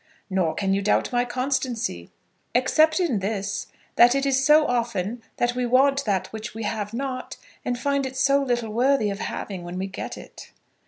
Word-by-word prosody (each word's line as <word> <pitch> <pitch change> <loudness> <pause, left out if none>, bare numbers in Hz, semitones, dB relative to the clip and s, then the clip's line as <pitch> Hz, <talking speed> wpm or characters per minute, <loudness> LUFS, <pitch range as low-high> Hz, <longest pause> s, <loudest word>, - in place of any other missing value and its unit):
"Nor 185 -4 +1
can 195 -1 0
you 200 - +1
doubt 210 - +1
my 245 0 +1
constancy." 245 - -2 0.5
"Except 310 +7 +4
in 310 - +1
this, 200 0 -3 0.3
that 240 +2 +7
it 275 0 +1
is 270 -1 +2
so 300 +2 +6
often 235 -3 -1 0.2
that 240 0 +1
we 250 0 -2
want 275 +3 +3
that 195 -4 0
which 220 0 -6
we 225 - -5
have 210 -1 -3
not, 255 +1 -4 0.3
and 245 - -1
find 280 +1 0
it 260 0 -8
so 275 +1 +3
little 240 -5 -1
worthy 245 -2 +2
of 200 - -5
having 190 -4 -5
when 175 +1 -6
we 190 - -2
get 195 - -6
it." - - -12
245 Hz, 190 wpm, -24 LUFS, 205-270 Hz, 0.5 s, that